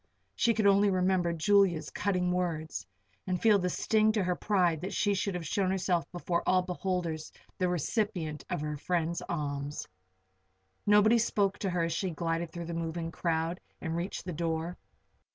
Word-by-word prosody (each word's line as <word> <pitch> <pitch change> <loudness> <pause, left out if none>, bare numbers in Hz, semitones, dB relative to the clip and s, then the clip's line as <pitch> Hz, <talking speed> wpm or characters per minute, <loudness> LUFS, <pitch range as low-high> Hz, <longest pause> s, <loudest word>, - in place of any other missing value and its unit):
She 230 -1 +3
could 215 -1 +1
only 200 +1 +5
remember 185 -2 +2
Julia's 175 -2 +3
cutting 180 -3 0
words, 160 - -2 0.4
and 185 -1 0
feel 215 -1 +5
the 180 -1 0
sting 215 +4 +2
to 210 -3 +1
her 180 0 0
pride 175 -6 +1
that 190 +3 -4
she 205 -3 +2
should 195 -1 -1
have 175 -2 -4
shown 190 +4 0
herself 180 -4 0
before 175 -1 -1
all 185 0 +4
beholders 180 -3 -3 0.3
the 180 -1 +2
recipient 175 - -1
of - - -2
her 150 0 -3
friend's 170 +2 -1
alms. 145 -3 -3 1.0
Nobody 210 +3 +6
spoke 205 -3 +1
to 195 - -1
her 175 -1 0
as 165 0 0
she 185 +3 -1
glided 165 0 -2
through 170 0 -6
the 170 - -5
moving 165 0 -3
crowd 165 +1 -1 0.2
and 165 -1 -3
reached 175 +2 -3
the 180 - -4
door. 165 +1 -2
180 Hz, 170 wpm, -30 LUFS, 165-195 Hz, 1.0 s, Nobody